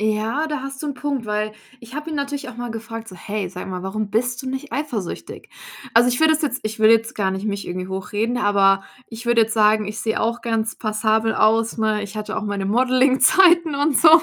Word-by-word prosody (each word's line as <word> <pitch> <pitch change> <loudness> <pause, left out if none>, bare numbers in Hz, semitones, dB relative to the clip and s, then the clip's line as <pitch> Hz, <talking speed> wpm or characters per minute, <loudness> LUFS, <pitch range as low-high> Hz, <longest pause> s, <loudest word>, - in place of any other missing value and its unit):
Ja, 220 +8 0
da 295 -3 -3
hast 275 +1 -7
du - - -3
'n 280 - -3
Punkt, 270 -2 -3
weil 210 0 -2 0.3
ich 240 +1 -13
habe 305 +2 -5
ihn 305 - -3
natürlich 280 -1 -3
auch 240 - -10
mal 240 -1 -5
gefragt: 225 0 -7
„So, 185 - -11
hey, 200 +1 -4
sag 180 +1 -8
mal, 185 0 -5
warum 205 +1 -3
bist 245 +3 -1
du 260 - -5
nicht 265 +2 -5
eifersüchtig?“ 245 - -5 0.5
Also, 240 +2 +6
ich 245 - 0
würde 315 0 +5
es 310 - -2
jetzt 265 -4 -1
ich 215 0 -4
würde 220 +1 +7
jetzt 225 0 -1
gar 195 -2 0
nicht 190 +3 -4
mich 200 -1 -3
irgendwie 185 +1 -4
hochreden, 205 +5 -2
aber 195 -3 +3 0.2
ich 230 +1 -9
würde 235 -1 +4
jetzt 225 +1 -1
sagen, 215 -1 +3
ich 210 +1 -5
sehe 220 0 -1
auch 235 +2 -1
ganz 225 -1 -1
passabel 220 0 0
aus, 225 +1 +2
ne? 215 -1 +1
Ich 205 +1 -8
hatte 215 - -4
auch - - -2
meine 200 -2 -3
Modelling-Zeiten 265 - +4
und 285 -1 +2
so.. 315 - +6
225 Hz, 230 wpm, -21 LUFS, 210-255 Hz, 0.5 s, würde